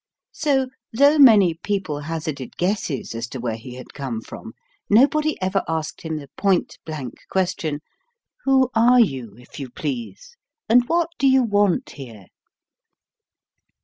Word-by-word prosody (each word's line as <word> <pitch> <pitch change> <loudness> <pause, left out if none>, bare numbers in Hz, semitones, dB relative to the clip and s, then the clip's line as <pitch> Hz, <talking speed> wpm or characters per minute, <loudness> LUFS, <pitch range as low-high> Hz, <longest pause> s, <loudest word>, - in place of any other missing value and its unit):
So, 270 -4 0 0.2
though 285 +6 +4
many 210 - +7
people 175 -3 -3
hazarded 155 -3 -5
guesses 175 - -2
as 115 +1 -4
to 130 - -7
where 115 -2 -2
he 125 +3 -10
had 130 - -11
come 130 -5 -4
from, 225 - -10 0.4
nobody 300 +8 +3
ever 190 +1 0
asked 160 -1 -3
him 160 -1 -4
the 140 -2 -9
point 195 -3 0
blank 145 -6 -5 0.2
question: 175 -5 -1 0.6
Who 265 -2 +3
are 240 +2 +5
you, 130 - 0
if 125 +3 -13
you 135 -2 -6
please, 145 - -6 0.3
and 245 +2 +5
what 335 0 +1
do 275 - +3
you 265 -1 +5
want 205 +1 +1
here? 115 -8 -11
175 Hz, 145 wpm, -22 LUFS, -, 0.6 s, many